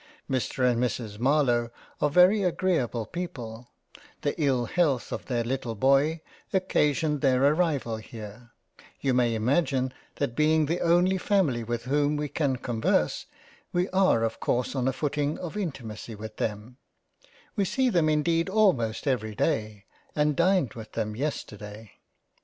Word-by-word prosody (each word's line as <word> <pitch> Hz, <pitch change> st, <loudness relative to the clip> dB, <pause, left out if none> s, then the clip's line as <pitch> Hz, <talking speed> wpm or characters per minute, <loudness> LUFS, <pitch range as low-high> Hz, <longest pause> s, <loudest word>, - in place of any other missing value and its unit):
Mr 130 Hz, 0 st, 0 dB
and 120 Hz, -1 st, +2 dB
Mrs 110 Hz, -3 st, -3 dB
Marlowe 125 Hz, -3 st, +2 dB, 0.3 s
are 150 Hz, -, +3 dB
very 180 Hz, +7 st, +5 dB
agreable 165 Hz, -, 0 dB
people; 120 Hz, -, -7 dB, 0.5 s
the 145 Hz, -, 0 dB
ill 130 Hz, -4 st, +2 dB
health 145 Hz, -3 st, 0 dB
of -, -, -5 dB
their 120 Hz, -3 st, 0 dB
little 120 Hz, -1 st, -3 dB
boy 140 Hz, +7 st, +3 dB, 0.3 s
occasioned 150 Hz, -5 st, +1 dB
their 130 Hz, -2 st, +3 dB
arrival 145 Hz, -7 st, +1 dB
here; 110 Hz, +1 st, -10 dB, 0.5 s
you 135 Hz, -2 st, +1 dB
may 120 Hz, -2 st, +2 dB
imagine 130 Hz, +2 st, +1 dB, 0.2 s
that 140 Hz, -5 st, -2 dB
being 155 Hz, +1 st, +3 dB
the 165 Hz, +4 st, -1 dB
only 180 Hz, +3 st, +3 dB
family 180 Hz, -, +1 dB
with 120 Hz, +1 st, -3 dB
whom 145 Hz, +3 st, +1 dB
we 150 Hz, 0 st, -2 dB
can 140 Hz, -2 st, 0 dB
converse, 120 Hz, -3 st, 0 dB, 0.4 s
we 175 Hz, +1 st, +1 dB
are 185 Hz, -11 st, +3 dB
of 115 Hz, 0 st, -2 dB
course 125 Hz, 0 st, 0 dB
on 130 Hz, -2 st, 0 dB
a -, -, +3 dB
footing 145 Hz, +2 st, -1 dB
of 175 Hz, +2 st, -6 dB
intimacy 120 Hz, -, -5 dB
with 110 Hz, +1 st, -9 dB
them; 110 Hz, +3 st, -4 dB, 0.8 s
we 205 Hz, -, +1 dB
see 260 Hz, +7 st, +1 dB
them 170 Hz, -9 st, +2 dB
indeed 165 Hz, +3 st, +1 dB
almost 185 Hz, -, +2 dB
every 110 Hz, -6 st, -1 dB
day, 110 Hz, -7 st, -1 dB, 0.3 s
and 150 Hz, -1 st, +2 dB
dined 170 Hz, -, +2 dB
with 110 Hz, -2 st, -10 dB
them 110 Hz, -2 st, -2 dB
yesterday. 105 Hz, -6 st, -5 dB
135 Hz, 145 wpm, -27 LUFS, 115-160 Hz, 0.8 s, very